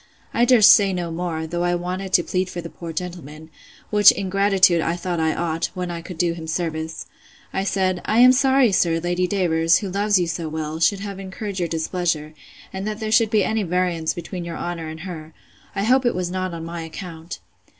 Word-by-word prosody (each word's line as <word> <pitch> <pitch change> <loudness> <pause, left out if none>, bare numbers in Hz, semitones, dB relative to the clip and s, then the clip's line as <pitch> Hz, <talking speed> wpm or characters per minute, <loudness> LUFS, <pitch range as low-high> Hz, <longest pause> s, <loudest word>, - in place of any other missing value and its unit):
I 235 - +3
durst 230 -4 +7
say 200 -2 +3
no 175 -2 -3
more, 165 -1 -3
though 175 +2 -3
I 175 0 +1
wanted 185 +2 -4
to 175 - +5
plead 185 +1 -1
for 175 - -6
the 170 -1 -7
poor 170 -1 -8
gentleman; 160 -3 -7 0.4
which, 210 -1 +8
in 190 -2 -4
gratitude, 195 -3 +4
I 165 +1 -1
thought 175 -1 -3
I 160 -1 +1
ought, 165 -1 -1
when 180 -1 -3
I 170 -1 -5
could 175 0 -9
do 170 0 +1
him 165 -1 -8
service. 160 -1 -3 0.5
I 190 - -1
said, 185 -2 0
I 215 - +1
am 250 +1 +8
sorry, 265 -2 +4
sir, 170 -3 +2
Lady 175 +2 0
Davers, 165 -4 +2
who 200 -4 -4
loves 205 +1 +2
you 180 - +1
so 165 -1 -4
well, 155 0 -4
should 195 +4 +2
have 200 -1 -6
incurred 195 +1 -6
your 175 - 0
displeasure, 160 -1 -2 0.4
and 190 +2 -4
that 215 0 -4
there 220 -1 -3
should 220 0 +4
be 215 -2 +3
any 220 +2 0
variance 175 -3 -1
between 175 +1 -6
your 170 -1 -6
honour 170 -2 -4
and 160 0 -8
her; 160 -3 -8 0.4
I 195 - -1
hope 255 +4 +3
it 240 - +1
was 180 -1 -2
not 185 0 -2
on 165 -1 -6
my 170 0 -6
account. 165 0 -8
175 Hz, 220 wpm, -22 LUFS, 165-195 Hz, 0.5 s, which